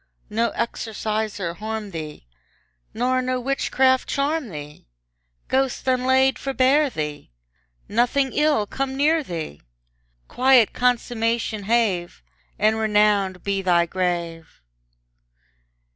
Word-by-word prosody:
No 230 Hz, +2 st, +1 dB
exorciser 215 Hz, -5 st, -3 dB
harm 215 Hz, +1 st, -5 dB
thee! 155 Hz, -, -7 dB, 0.7 s
Nor 255 Hz, +2 st, 0 dB
no 255 Hz, 0 st, -1 dB
witchcraft 260 Hz, 0 st, +1 dB
charm 285 Hz, -1 st, -1 dB
thee! 150 Hz, -, -10 dB, 0.6 s
Ghost 265 Hz, 0 st, -1 dB
unlaid 260 Hz, +1 st, +3 dB
forbear 275 Hz, +2 st, +2 dB
thee! 150 Hz, -, -5 dB, 0.6 s
Nothing 245 Hz, +5 st, +1 dB
ill 300 Hz, -8 st, +2 dB
come 270 Hz, +4 st, -4 dB
near 310 Hz, +3 st, +3 dB
thee! 165 Hz, -, -6 dB, 0.7 s
Quiet 255 Hz, -3 st, +4 dB
consummation 230 Hz, -3 st, 0 dB
have; 200 Hz, -, 0 dB, 0.3 s
And 215 Hz, +2 st, +2 dB
renowned 210 Hz, -4 st, +2 dB
be 200 Hz, -1 st, -1 dB
thy 175 Hz, -2 st, +3 dB
grave! 170 Hz, -2 st, -3 dB
225 Hz, 100 wpm, -23 LUFS, 190-260 Hz, 0.7 s, Quiet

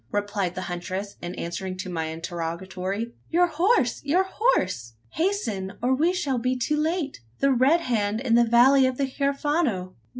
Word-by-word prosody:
replied 205 Hz, -3 st, -1 dB
the 185 Hz, -, -4 dB
huntress, 185 Hz, +3 st, -5 dB
in 175 Hz, +1 st, -5 dB
answer 175 Hz, +3 st, -4 dB
to 185 Hz, +1 st, -6 dB
my 165 Hz, -3 st, -2 dB
interrogatory. 180 Hz, +6 st, -4 dB, 0.2 s
"Your 350 Hz, +2 st, +4 dB
horse! 345 Hz, -, +1 dB
your 325 Hz, +7 st, +3 dB
horse! 185 Hz, -, 0 dB, 0.2 s
Hasten, 225 Hz, -, -1 dB
or 250 Hz, +2 st, +1 dB
we 315 Hz, +7 st, +3 dB
shall 290 Hz, -9 st, -1 dB
be 255 Hz, +2 st, 0 dB
too 250 Hz, +5 st, 0 dB
late. 310 Hz, -, -1 dB, 0.2 s
The 275 Hz, -, +3 dB
Red 270 Hz, +7 st, +4 dB
Hand 215 Hz, -6 st, 0 dB
in 245 Hz, -2 st, 0 dB
the 235 Hz, +1 st, +6 dB
valley 255 Hz, +3 st, +5 dB
of 260 Hz, -1 st, -2 dB
the 275 Hz, -, +1 dB
Huerfano! 275 Hz, -, -1 dB
235 Hz, 165 wpm, -25 LUFS, 185-285 Hz, 0.2 s, the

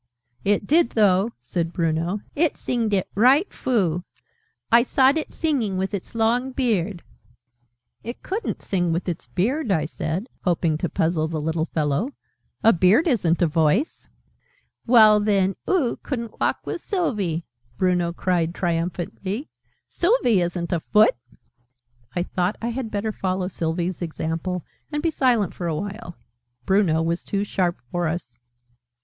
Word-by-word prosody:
"It 205 Hz, 0 st, +1 dB
did, 310 Hz, 0 st, +4 dB
though!" 200 Hz, -1 st, +4 dB
said 165 Hz, +6 st, -2 dB
Bruno. 170 Hz, +4 st, -1 dB
"It 320 Hz, +1 st, +2 dB
singed 230 Hz, -3 st, -1 dB
it 195 Hz, -2 st, +1 dB
right 265 Hz, -, +4 dB
froo. 185 Hz, -9 st, 0 dB, 0.7 s
I 235 Hz, +1 st, +7 dB
sawed 265 Hz, +3 st, +3 dB
it 315 Hz, -, -2 dB
singing 255 Hz, -, 0 dB
with 190 Hz, +2 st, -2 dB
its 200 Hz, +3 st, -5 dB
long 240 Hz, +4 st, +1 dB
beard 210 Hz, -8 st, 0 dB, 0.5 s
" 120 Hz, 0 st, -46 dB
"It 235 Hz, +2 st, -7 dB
couldn't 405 Hz, +5 st, -3 dB
sing 175 Hz, -3 st, 0 dB
with 170 Hz, +3 st, -2 dB
its 175 Hz, -2 st, -4 dB
beard," 240 Hz, -, 0 dB
I 160 Hz, -5 st, +2 dB
said, 160 Hz, +5 st, -3 dB, 0.2 s
hoping 165 Hz, -3 st, +1 dB
to 175 Hz, -, -1 dB
puzzle 160 Hz, -1 st, 0 dB
the 160 Hz, -1 st, -3 dB
little 160 Hz, +2 st, -1 dB
fellow: 155 Hz, -, -1 dB, 0.5 s
"a 225 Hz, -, +7 dB
beard 185 Hz, -, +4 dB
isn't 180 Hz, -, +2 dB
a -, -, +6 dB
voice." 160 Hz, -, +1 dB, 0.8 s
"Well 215 Hz, -3 st, +7 dB
then, 195 Hz, -2 st, +2 dB
oo 320 Hz, -11 st, +2 dB
couldn't 235 Hz, -5 st, -5 dB
walk -, -, 0 dB
with -, -, -4 dB
Sylvie!" 205 Hz, -, -1 dB, 0.3 s
Bruno 180 Hz, -2 st, +1 dB
cried 170 Hz, -1 st, 0 dB
triumphantly. 180 Hz, -, -3 dB, 0.4 s
"Sylvie 340 Hz, -, +2 dB
isn't 175 Hz, +1 st, -2 dB
a 170 Hz, -, +1 dB
foot!" 210 Hz, +6 st, +4 dB, 1.0 s
I 175 Hz, -, +1 dB
thought 180 Hz, +2 st, -1 dB
I 235 Hz, -, -2 dB
had 240 Hz, -1 st, -3 dB
better 215 Hz, +1 st, -2 dB
follow 185 Hz, -2 st, -2 dB
Sylvie's 170 Hz, +1 st, -2 dB
example, 165 Hz, +1 st, -3 dB, 0.3 s
and 295 Hz, 0 st, -2 dB
be 330 Hz, -, +2 dB
silent 240 Hz, -, +2 dB
for 175 Hz, -, -4 dB
a 160 Hz, -, -1 dB
while. 205 Hz, +1 st, -6 dB, 0.5 s
Bruno 185 Hz, -5 st, +3 dB
was 170 Hz, +1 st, -1 dB
too 200 Hz, 0 st, -1 dB
sharp 180 Hz, -4 st, -1 dB
for 175 Hz, -1 st, 0 dB
us. 155 Hz, -8 st, -5 dB
190 Hz, 150 wpm, -23 LUFS, 170-230 Hz, 1.0 s, I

